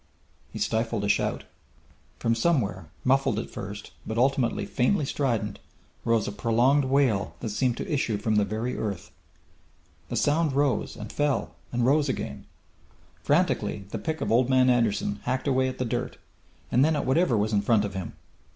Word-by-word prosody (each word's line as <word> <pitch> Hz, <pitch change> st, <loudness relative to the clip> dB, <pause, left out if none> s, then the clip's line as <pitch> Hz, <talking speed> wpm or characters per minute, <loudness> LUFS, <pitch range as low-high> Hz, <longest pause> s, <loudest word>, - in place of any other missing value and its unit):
He -, -, -7 dB
stifled 115 Hz, -1 st, -1 dB
a -, -, 0 dB
shout. -, -, 0 dB, 0.7 s
From 115 Hz, -, +1 dB
somewhere, 115 Hz, -, 0 dB, 0.2 s
muffled 135 Hz, -3 st, +2 dB
at 110 Hz, -, -4 dB
first, 100 Hz, +1 st, -7 dB
but 110 Hz, -, -4 dB
ultimately 130 Hz, 0 st, +1 dB
faintly 145 Hz, +6 st, +1 dB
strident, 115 Hz, -8 st, -1 dB, 0.5 s
rose 115 Hz, -2 st, +2 dB
a -, -, -2 dB
prolonged 120 Hz, +7 st, +2 dB
wail 130 Hz, -7 st, +1 dB
that 115 Hz, -, -3 dB
seemed 120 Hz, +3 st, 0 dB
to -, -, -4 dB
issue 130 Hz, -8 st, 0 dB
from 105 Hz, +1 st, 0 dB
the 105 Hz, -, +4 dB
very 110 Hz, +5 st, -3 dB
earth. 100 Hz, -5 st, -4 dB, 1.0 s
The -, -, -3 dB
sound 150 Hz, 0 st, +2 dB
rose, 140 Hz, -1 st, +1 dB
and 105 Hz, -1 st, -8 dB
fell, 145 Hz, -1 st, 0 dB, 0.2 s
and 120 Hz, -1 st, +1 dB
rose 145 Hz, +2 st, +3 dB
again. -, -, -4 dB, 0.8 s
Frantically 100 Hz, -, +1 dB
the -, -, -4 dB
pick 160 Hz, -1 st, -3 dB
of -, -, -1 dB
Old 120 Hz, +2 st, +3 dB
Man 130 Hz, -1 st, +5 dB
Anderson 105 Hz, -4 st, +1 dB
hacked 130 Hz, +3 st, -1 dB
away 130 Hz, -1 st, +2 dB
at 130 Hz, -, -4 dB
the 130 Hz, -, -1 dB
dirt, 115 Hz, -, -3 dB, 0.5 s
and 125 Hz, -, +4 dB
then 155 Hz, +1 st, +3 dB
at -, -, -1 dB
whatever 130 Hz, -2 st, +3 dB
was 105 Hz, +1 st, 0 dB
in 100 Hz, -, +3 dB
front 105 Hz, 0 st, +3 dB
of 100 Hz, -, -5 dB
him. 95 Hz, -2 st, -5 dB
120 Hz, 175 wpm, -26 LUFS, 105-135 Hz, 1.0 s, Man